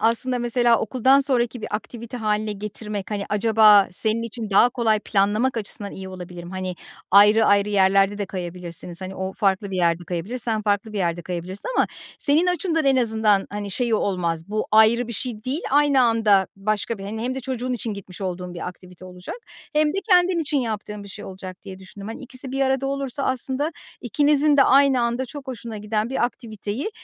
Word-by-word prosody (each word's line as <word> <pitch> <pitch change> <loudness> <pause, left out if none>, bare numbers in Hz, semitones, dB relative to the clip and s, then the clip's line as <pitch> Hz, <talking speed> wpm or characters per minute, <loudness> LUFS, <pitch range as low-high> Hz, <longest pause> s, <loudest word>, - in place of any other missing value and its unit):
aslında, 235 +3 +1
mesela, 240 -1 +2
okuldan 260 +4 +3
sonraki 245 -3 0
bir - - -4
aktivite 235 +2 -6
hâline 215 -1 -1
getirmek, 210 0 -6
hani, 205 -1 -2
acaba 210 -1 +5
senin 220 +4 0
için 230 -1 -6
daha 200 +5 +6
kolay 225 -3 +1
planlamak 215 +6 +1
açısından 205 -1 -5
iyi 190 0 -8
olabilir 180 -2 -9
mi? 175 - -9
Hani, 185 -1 -4 0.4
ayrı 210 +3 +7
ayrı 200 0 +4
yerlerde 195 0 +3
de 205 - -2
kayabilirsiniz. 175 -1 -6
Hani, 190 0 -6
o 190 0 -4
farklı 195 -1 0
bir 190 - -3
yerde 175 -1 +1
kayabilir, 180 +9 -4
sen 220 -3 -1
farklı 205 +1 0
bir 205 - -3
yerde 170 -1 -1
kayabilirsin 180 +3 -6
ama - - +4 0.3
senin 310 +5 +2
açından 335 -3 0
en 270 -1 +4
azından, 220 -4 +2
hani, 205 -1 -5
şeyi 235 +3 0
olmaz. 175 -4 -1
Bu 215 +1 -2
ayrı 220 +2 +5
bir - - -4
şey 230 -2 -4
değil, 270 +6 -2
aynı 285 -1 +4
anda 220 -5 +3
başka 215 +2 -2
bir, 195 - -8
hani, 220 +3 -5
hem 255 +1 -2
de 265 - -4
çocuğun 255 -1 -3
için 230 -3 -3
gitmiş 190 -2 -10
olduğun 180 -1 -4
bir 175 - -5
aktivite 180 0 -13
olacak 180 - -8 0.4
hem 305 0 +3
de 320 - -3
kendin 360 0 +5
için 300 -2 0
yaptığın 210 -3 -4
bir - - -11
şey 205 +2 -9
olacak 185 -1 -9
diye 190 -1 -9
düşündüm. 195 +2 -10
Hani, 225 - -7
ikisi 255 0 -6
bir 270 - -2
arada 265 0 +1
olursa 275 -1 -2
aslında 265 +5 -1 0.3
ikinizin 290 +3 +3
de 275 - +7
aynı 275 -1 +5
anda 240 +2 -1
çok 285 +1 -9
hoşuna 235 -3 -6
giden 210 +2 -2
bir 265 - +1
aktiviteyi, 230 - -4
215 Hz, 195 wpm, -23 LUFS, 195-255 Hz, 0.4 s, ayrı